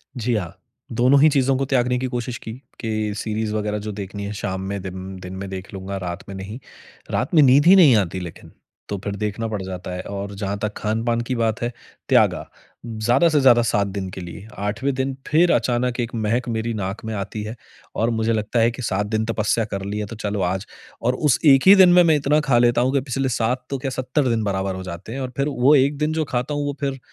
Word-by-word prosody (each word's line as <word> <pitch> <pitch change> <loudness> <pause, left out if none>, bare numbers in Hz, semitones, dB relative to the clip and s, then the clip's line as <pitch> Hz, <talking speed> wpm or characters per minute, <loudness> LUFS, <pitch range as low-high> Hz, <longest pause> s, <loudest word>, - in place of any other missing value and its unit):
जी 120 0 -1
हाँ। 90 -6 -3 0.4
दोनों 130 +3 +5
ही 155 - +7
चीज़ों 135 -2 +2
को 135 - 0
त्यागने 125 -2 +1
की 130 - -2
कोशिश 120 -1 -4
की 110 - -6 0.3
कि 110 -2 -2
सीरीज़ 110 0 -2
वग़ैरह 105 0 -1
जो - - -2
देखनी 100 0 -6
है 100 - -4
शाम 95 -2 -4
में 100 -1 -3
दिन 95 0 -7
दिन 90 0 -8
में 95 0 -6
देख 95 +1 -7
लूँगा, 95 0 -5
रात 90 0 -5
में 100 - -6
नहीं। 100 +5 -7 0.5
रात 125 +7 -1
में 155 - +8
नींद 135 +3 +5
ही 185 +3 +8
नहीं 160 -10 +7
आती, 95 -2 -1
लेकिन 85 -2 -9 0.4
तो 100 - -2
फ़िर 100 -1 -3
देखना 105 +2 -3
पड़ 105 -3 -3
जाता 95 -1 -6
है। 90 - -4
और 100 0 -5
जहाँ 100 0 -3
तक 105 0 -2
खान-पान 115 +2 -1
की 130 - 0
बात 115 -2 0
है, 120 0 -1 0.4
त्यागा। - - +3 0.4
ज़्यादा-से-ज़्यादा 120 +3 +3
7 105 -3 +1
दिन 95 -1 -4
के 95 - -8
लिए 90 +4 -9 0.2
आठवें 115 +7 -1
दिन 135 +1 -1
फ़िर 170 +3 +4
अचानक 125 0 +1
1 120 -1 -2
महक 115 +3 -1
मेरी 115 0 -2
नाक 100 -1 -4
में 110 - -3
आती 100 +2 -4
है 110 +2 -6 0.4
और 115 - +1
मुझे 110 +1 +1
लगता 110 +2 -1
है 115 +1 +4
कि 125 - -8
7 100 -2 -1
दिन 110 +1 -1
तपस्या 115 0 0
कर 100 -1 -3
ली 100 +1 -3
है 105 - -2
तो 115 - -8
चलो 105 -2 -3
आज। 95 +2 -1 0.4
और 125 +2 +1
उस 145 0 +2
1 135 -3 +7
ही 195 - +10
दिन 190 -2 +7
में, 180 - +7
मैं 160 -2 +4
इतना 150 +1 +2
ख़ा 135 -5 +2
लेता 120 0 +3
हूँ 130 +2 +1
कि 140 - +2
पिछले 135 0 -2
7 125 +2 -1
तो 140 - -2
क्या 135 +1 -4
70 130 +2 -1
दिन 115 -2 0
बराबर 95 -1 -1
हो 95 - -6
जाते 90 +4 -7
हैं 135 - -4
और 130 - -3
फ़िर 140 - +1
वो 140 +1 +4
1 140 +1 +3
दिन 150 +2 0
जो 160 -1 0
खाता 125 +4 -2
हूँ 145 0 -1
वो 145 - -2
फ़िर 135 -2 -2
115 Hz, 240 wpm, -22 LUFS, 100-130 Hz, 0.5 s, ही